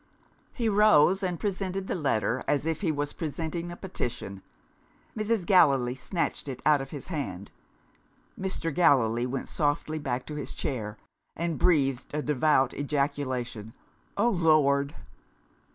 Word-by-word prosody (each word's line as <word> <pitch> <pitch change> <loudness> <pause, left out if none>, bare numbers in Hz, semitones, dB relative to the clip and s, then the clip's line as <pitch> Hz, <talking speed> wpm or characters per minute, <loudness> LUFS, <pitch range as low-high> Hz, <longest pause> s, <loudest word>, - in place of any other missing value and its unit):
He 235 -3 -2
rose 200 -3 +5
and 180 -3 -2
presented 195 -1 -2
the - - -2
letter, 130 - 0
as 145 0 +1
if 160 -1 -1
he 175 -6 +1
was 145 -1 -3
presenting 165 +2 -4
a - - -6
petition. 120 - -5 0.7
Mrs. 215 -3 0
Gallilee 140 -10 +4
snatched 155 +5 -3
it 130 -2 -5
out 150 -2 +5
of 135 - -7
his 145 +4 -8
hand. 100 - -4 0.8
Mr. 185 -4 -2
Gallilee 125 -7 +3
went 130 +1 -4
softly 155 +1 -1
back 130 -3 -3
to 150 - -7
his 145 - -5
chair, 110 -6 -3 0.4
and 170 -1 -2
breathed 135 -7 +2
a 150 - -1
devout 150 -1 +2
ejaculation. 135 -6 -2 0.4
"Oh, 220 +4 +3
Lord!" 150 -7 +3
150 Hz, 135 wpm, -28 LUFS, 130-175 Hz, 0.8 s, rose